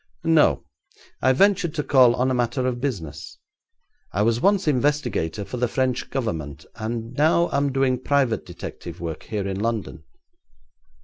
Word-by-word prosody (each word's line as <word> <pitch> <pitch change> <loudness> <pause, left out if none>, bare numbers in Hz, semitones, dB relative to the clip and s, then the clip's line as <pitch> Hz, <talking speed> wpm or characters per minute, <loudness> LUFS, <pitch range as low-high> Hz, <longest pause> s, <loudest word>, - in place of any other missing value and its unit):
'No. 155 - +3 0.6
I 130 - +4
ventured 175 +2 +2
to 150 - -1
call 125 -4 +5
on 130 +1 +1
a - - +1
matter 125 +1 0
of 125 -1 -2
business. 100 - -5 0.7
I 100 - 0
was 115 +2 +1
once 200 -3 +2
investigator 125 - 0
for 110 +6 -6
the 125 0 +1
French 130 +1 -1
Government, 80 - -4
and 115 +1 -5
now 160 +5 +3
am 140 0 +1
doing 130 -1 +1
private 130 -6 +1
detective - - -9
work 80 -2 -5
here 105 -3 -4
in 95 0 -3
London.' 110 -7 -3
125 Hz, 150 wpm, -23 LUFS, 110-140 Hz, 0.7 s, call